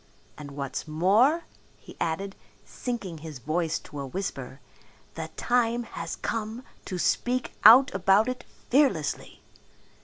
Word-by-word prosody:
And 150 Hz, -1 st, -9 dB
what's 140 Hz, +2 st, -4 dB
more," 210 Hz, -, +3 dB, 0.3 s
he -, -, -14 dB
added, 195 Hz, +4 st, -2 dB, 0.3 s
sinking 205 Hz, -10 st, -5 dB
his 155 Hz, -2 st, -8 dB
voice 155 Hz, +6 st, -1 dB
to 145 Hz, -, -10 dB
a 140 Hz, -, -4 dB
whisper, 135 Hz, -5 st, -5 dB, 0.5 s
"the 160 Hz, -1 st, -5 dB
time 240 Hz, -1 st, +1 dB
has -, -, -6 dB
come 225 Hz, +2 st, -4 dB, 0.2 s
to 185 Hz, -, -4 dB
speak 250 Hz, +7 st, 0 dB
out 255 Hz, +6 st, +9 dB
about 195 Hz, +3 st, +4 dB
it 255 Hz, 0 st, -3 dB, 0.3 s
fearlessly." 255 Hz, -, +1 dB
195 Hz, 125 wpm, -27 LUFS, 160-240 Hz, 0.5 s, out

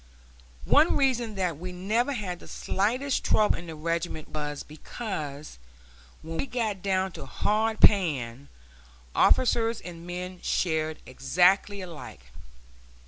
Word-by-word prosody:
One 315 Hz, -, +5 dB
reason 245 Hz, -5 st, +1 dB
that 180 Hz, -6 st, -1 dB
we 180 Hz, +1 st, -5 dB
never 215 Hz, +9 st, 0 dB
had 190 Hz, -7 st, -4 dB
the -, -, -13 dB
slightest 250 Hz, +8 st, 0 dB
trouble 215 Hz, -1 st, +3 dB
in 170 Hz, -, -9 dB
the 160 Hz, -, -6 dB
regiment 165 Hz, 0 st, -3 dB
was 150 Hz, -1 st, -4 dB
because, 155 Hz, -, -6 dB, 0.6 s
when 165 Hz, +1 st, -5 dB
we -, -, -1 dB
got 220 Hz, -7 st, -2 dB
down 190 Hz, -1 st, 0 dB
to -, -, -9 dB
hard 220 Hz, +1 st, 0 dB
pan, 140 Hz, -, +3 dB, 0.7 s
officers 230 Hz, -2 st, +3 dB
and 170 Hz, -1 st, -9 dB
men 180 Hz, +1 st, -5 dB
shared 160 Hz, -2 st, -1 dB
exactly 180 Hz, +10 st, +2 dB
alike. 150 Hz, -, -10 dB
180 Hz, 125 wpm, -27 LUFS, 155-215 Hz, 0.7 s, One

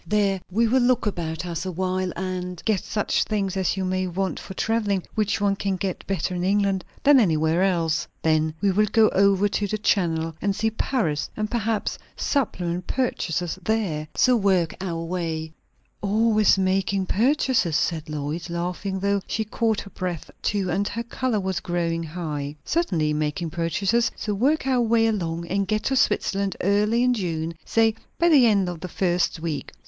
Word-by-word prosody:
There 195 Hz, -1 st, +1 dB
we 225 Hz, +5 st, +2 dB
will 255 Hz, +3 st, +3 dB
look 245 Hz, -1 st, +2 dB
about 170 Hz, -4 st, -3 dB
us 170 Hz, -2 st, -3 dB
a 185 Hz, -, -3 dB
while 185 Hz, +1 st, -1 dB
and 180 Hz, -1 st, -4 dB
get 215 Hz, -4 st, +1 dB
such 210 Hz, -2 st, 0 dB
things 200 Hz, -3 st, -2 dB
as 190 Hz, 0 st, 0 dB
you 190 Hz, -, -1 dB
may 185 Hz, 0 st, 0 dB
want 190 Hz, +2 st, -2 dB
for 190 Hz, -, -9 dB
travelling, 210 Hz, -4 st, 0 dB
which 210 Hz, -2 st, 0 dB
one 200 Hz, -1 st, +2 dB
can 195 Hz, -1 st, -1 dB
get 185 Hz, 0 st, -4 dB
better 185 Hz, -2 st, -1 dB
in 175 Hz, 0 st, -2 dB
England 195 Hz, -1 st, +1 dB, 0.2 s
than 285 Hz, -1 st, +7 dB
anywhere 160 Hz, -4 st, +2 dB
else. 165 Hz, -5 st, +1 dB, 0.2 s
Then 155 Hz, -1 st, +2 dB
we 200 Hz, -1 st, +3 dB
will 210 Hz, +3 st, +3 dB
go 215 Hz, +1 st, +4 dB
over 200 Hz, +1 st, +3 dB
the 205 Hz, +1 st, -1 dB
Channel 165 Hz, -6 st, 0 dB
and 200 Hz, -1 st, 0 dB
see 220 Hz, +1 st, 0 dB
Paris, 215 Hz, -, -1 dB
and 215 Hz, 0 st, -2 dB
perhaps 225 Hz, -2 st, -1 dB, 0.2 s
supplement 180 Hz, -, -1 dB
purchases 180 Hz, -9 st, -1 dB
there. 185 Hz, -8 st, -1 dB
So 255 Hz, -1 st, +4 dB
work 190 Hz, -6 st, +2 dB
our 170 Hz, -3 st, -3 dB
way 165 Hz, -2 st, -3 dB, 0.2 s
" -, -, -42 dB
"Always 215 Hz, 0 st, +3 dB
making 190 Hz, 0 st, +1 dB
purchases?" 230 Hz, -, +2 dB
said 160 Hz, -3 st, -1 dB
Lois, 150 Hz, +3 st, -4 dB
laughing, 180 Hz, +3 st, -3 dB
though 200 Hz, 0 st, +1 dB
she 220 Hz, -, -1 dB
caught 220 Hz, 0 st, 0 dB
her 200 Hz, -, -12 dB
breath 180 Hz, -4 st, -5 dB
too, 195 Hz, -3 st, 0 dB
and 200 Hz, +4 st, 0 dB
her 230 Hz, -, -3 dB
colour 235 Hz, -1 st, -1 dB
was 190 Hz, -1 st, -2 dB
growing 170 Hz, -2 st, -1 dB
high. 155 Hz, -3 st, -4 dB
"Certainly, 170 Hz, -, +1 dB
making 155 Hz, +2 st, -2 dB
purchases. 190 Hz, +8 st, +1 dB
So 210 Hz, -, -3 dB
work 270 Hz, +9 st, +1 dB
our 260 Hz, -2 st, +2 dB
way 230 Hz, -1 st, +3 dB
along, 170 Hz, -6 st, -1 dB
and 195 Hz, +2 st, 0 dB
get 215 Hz, +1 st, 0 dB
to 270 Hz, -, 0 dB
Switzerland 200 Hz, -6 st, +1 dB
early 210 Hz, +5 st, +2 dB
in 250 Hz, 0 st, +3 dB
June 170 Hz, -6 st, -2 dB
say 225 Hz, -1 st, +2 dB, 0.2 s
by 340 Hz, +1 st, +4 dB
the 275 Hz, -7 st, +6 dB
end 200 Hz, -4 st, +3 dB
of 175 Hz, -2 st, -5 dB
the 185 Hz, -, -5 dB
first 180 Hz, -2 st, 0 dB
week." 160 Hz, -3 st, -4 dB
190 Hz, 180 wpm, -24 LUFS, 170-215 Hz, 0.2 s, than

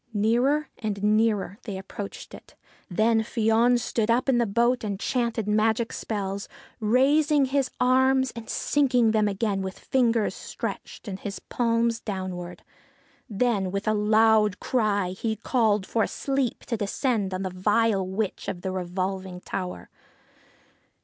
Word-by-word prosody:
Nearer 245 Hz, +8 st, +2 dB
and 205 Hz, -3 st, -3 dB
nearer 210 Hz, -1 st, +1 dB
they 200 Hz, -3 st, -6 dB
approached 195 Hz, +1 st, -8 dB
it. -, -, -13 dB, 0.3 s
Then 220 Hz, +4 st, +2 dB
Fion 225 Hz, +2 st, +2 dB
stood 230 Hz, -2 st, -1 dB
up 240 Hz, +4 st, +2 dB
in 255 Hz, -3 st, +3 dB
the 235 Hz, -, +2 dB
boat 235 Hz, +4 st, +2 dB
and 200 Hz, -2 st, -3 dB
chanted 235 Hz, -3 st, -1 dB
magic 220 Hz, +2 st, +1 dB
spells, 200 Hz, -2 st, -4 dB, 0.3 s
raising 280 Hz, +6 st, +3 dB
his 270 Hz, 0 st, 0 dB
arms 260 Hz, +1 st, +3 dB
and 230 Hz, -1 st, -8 dB
sinking 250 Hz, -6 st, +2 dB
them 215 Hz, -1 st, +2 dB
again 200 Hz, -1 st, -1 dB
with 190 Hz, 0 st, -5 dB
fingers 235 Hz, -4 st, +1 dB
stretched -, -, -7 dB
and 190 Hz, -1 st, -5 dB
his 200 Hz, 0 st, -5 dB
palms 230 Hz, -1 st, 0 dB
downwards. 185 Hz, -4 st, -5 dB, 0.7 s
Then 210 Hz, -3 st, 0 dB
with 200 Hz, +2 st, -3 dB
a 215 Hz, -, +3 dB
loud 215 Hz, -1 st, +3 dB
cry 205 Hz, -6 st, 0 dB
he 220 Hz, +4 st, -2 dB
called 220 Hz, -3 st, +1 dB
for 225 Hz, 0 st, 0 dB
sleep 270 Hz, -3 st, -2 dB
to 230 Hz, -, -2 dB
descend 205 Hz, 0 st, -1 dB
on 185 Hz, +1 st, -3 dB
the 185 Hz, -, -3 dB
vile 205 Hz, +2 st, +2 dB
witch 190 Hz, +2 st, -3 dB
of 175 Hz, -, -4 dB
the 190 Hz, -, -3 dB
revolving 185 Hz, 0 st, -3 dB
tower. 180 Hz, -, -5 dB
220 Hz, 145 wpm, -26 LUFS, 195-240 Hz, 0.7 s, in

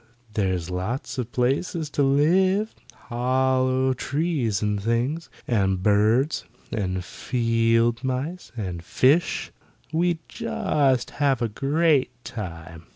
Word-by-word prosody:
There's 95 Hz, -4 st, -1 dB
lots 110 Hz, +10 st, -3 dB
of 120 Hz, -1 st, -3 dB
places 145 Hz, +7 st, 0 dB
to 145 Hz, -, 0 dB
live, 185 Hz, +10 st, +3 dB, 0.2 s
hollow 130 Hz, +1 st, +1 dB
trees 135 Hz, -, -1 dB
and 105 Hz, -1 st, 0 dB
things; 120 Hz, +9 st, -1 dB, 0.2 s
and 95 Hz, -5 st, +1 dB
birds, 110 Hz, +8 st, +3 dB, 0.3 s
and 95 Hz, -4 st, -2 dB
field 115 Hz, 0 st, +1 dB
mice, 135 Hz, +8 st, -3 dB
and 90 Hz, -6 st, -4 dB
fish; 140 Hz, -, +2 dB, 0.4 s
we'd 170 Hz, +1 st, +2 dB
just 135 Hz, -4 st, 0 dB
have 135 Hz, -4 st, +3 dB
a -, -, +2 dB
great 145 Hz, +4 st, +2 dB
time." 85 Hz, -5 st, -7 dB
125 Hz, 105 wpm, -24 LUFS, 105-145 Hz, 0.4 s, live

